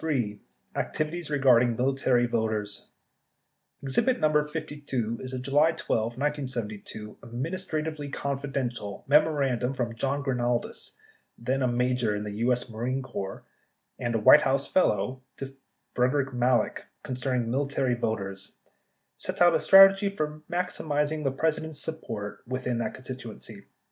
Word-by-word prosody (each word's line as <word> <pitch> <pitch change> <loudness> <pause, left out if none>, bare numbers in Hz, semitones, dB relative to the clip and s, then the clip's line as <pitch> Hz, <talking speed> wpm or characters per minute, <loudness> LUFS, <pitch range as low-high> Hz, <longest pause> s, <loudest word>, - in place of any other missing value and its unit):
ACTIVITIES 155 +1 -2
RE 145 - +1 0.3
MILITARY 125 +1 +2
VOTERS 110 -3 -2 0.9
Exhibit 240 - +2
No. 155 - +4
52 150 -1 -6
61 115 -3 -2
is 130 - -6
a 130 - -3
July 145 +5 +3
12, 115 -6 -1
1972, 120 -7 -4
"Administratively 155 +3 -3
Confiden 140 -3 -2
tial" 100 -3 -6
memorandum 135 -4 +3
from 120 -2 -2
John 135 +4 -1
Grinalds, 125 -3 -1 0.4
then 130 +3 -1
a 130 - +3
major 125 -2 +1
in 105 - -3
the 105 -1 -5
U.S. 125 0 +1
Marine 125 +4 -2
Corps 100 -7 -6 0.6
and 120 -1 -1
a - - +2
White 150 +7 +8
House 135 0 +1
fellow, 130 - +1 0.2
to 135 0 -6 0.4
Frederick 130 +2 +1
Malek 125 0 +1 0.2
con 130 - -4
cerning 125 -1 -1
military 135 +1 0
voters, 100 -4 -3 0.6
sets - - -5
out 175 - +8
a 165 - +3
basic - - -5
strategy 195 +1 +8
for 155 -5 -4
maximizing 155 -4 -1
the 135 - +1
President's 155 +1 -1
support 115 -11 -5
within 125 -1 -2
that 115 - -2
constituency. 120 -5 -9
130 Hz, 135 wpm, -27 LUFS, 120-150 Hz, 0.9 s, White